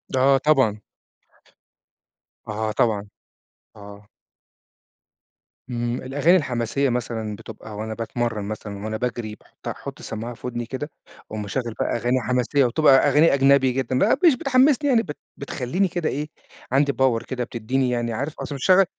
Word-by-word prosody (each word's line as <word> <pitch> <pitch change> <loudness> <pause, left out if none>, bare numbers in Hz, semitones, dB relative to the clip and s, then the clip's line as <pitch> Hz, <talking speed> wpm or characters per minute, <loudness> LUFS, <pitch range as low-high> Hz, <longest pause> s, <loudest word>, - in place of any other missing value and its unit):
آه 135 +1 +5
طبعًا. 130 -8 +2 1.7
آه 110 0 -2
طبعًا، 105 -2 +1 0.7
آه. 100 0 -12 1.6
إمم، 120 0 -2
الأغاني 145 +8 +3
الحماسية 130 -1 0
مثلًا 115 -3 -3
بتبقى 110 0 -10
وأنا 110 +1 -4
باتمرّن 115 -1 -2
مثلًا 105 -1 -6
وأنا 110 0 -2
باجري 120 -3 -3
باحطّها - - -9
احط - - -9
السماعة 115 +2 -5
في 120 - -8
ودني 120 -1 -3
كده، 135 +5 -5 0.4
وأقوم 110 0 -4
مشغل 115 +3 -3
بَقى - - 0
أغاني 125 +2 +1
حماسية، 125 +3 +2
وبتبقى 135 +2 +5
أغاني 150 +3 +5
أجنبي 135 -1 +4
جدًا، 130 0 -1
بَـقى 265 - +3
مش 305 - +6
بتحمّسني 275 +3 +3
يعني 235 -4 +4
بت 150 -8 -7 0.2
بتخلّيني 140 +7 -1
كده 170 -2 -2
إيه، 150 +2 -3 0.4
عندي 140 +1 +3
power 125 -3 +2
كده 125 -2 -2
بتديني 125 +3 -1
يعني 120 -1 -1
عارف 140 +7 -3
أصل 145 - -5
مش 140 +7 +1
هاشغّل 190 +1 +7
125 Hz, 150 wpm, -23 LUFS, 110-140 Hz, 1.7 s, هاشغّل